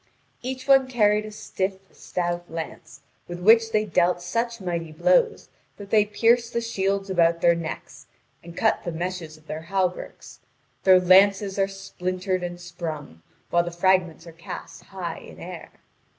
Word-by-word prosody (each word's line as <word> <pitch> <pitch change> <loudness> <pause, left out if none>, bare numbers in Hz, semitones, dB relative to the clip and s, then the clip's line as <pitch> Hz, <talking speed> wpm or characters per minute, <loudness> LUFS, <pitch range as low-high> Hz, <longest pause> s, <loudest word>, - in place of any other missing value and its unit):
Each 255 +1 -5
one 270 -1 +6
carried 210 -4 +2
a - - -8
stiff, 190 -2 -3
stout 175 -1 -4
lance, 160 -3 -7 0.3
with 175 0 -6
which 225 +4 +5
they 215 -1 +2
dealt 175 -2 +2
such 230 +7 -2
mighty 170 -4 -3
blows 470 - +2 0.3
that 200 -1 -11
they 210 -2 +5
pierced 230 +3 +2
the 235 - +1
shields 195 -3 -1
about 170 -2 +3
their 170 - +5
necks, 165 -1 -7 0.4
and 170 0 -12
cut 220 - +2
the 175 - -3
meshes 170 -2 -5
of 155 - -23
their 155 0 -5
hauberks; 180 +1 -3 0.5
their 185 -1 +8
lances 195 +2 +4
are 195 - +3
splintered 185 -1 -3
and 175 0 -5
sprung, 160 - -7 0.3
while 170 0 +3
the 175 - -4
fragments 175 -1 +1
are 165 - -10
cast 165 +1 -9
high - - -6
in - - -13
air. - - -8
185 Hz, 160 wpm, -24 LUFS, 170-210 Hz, 0.5 s, their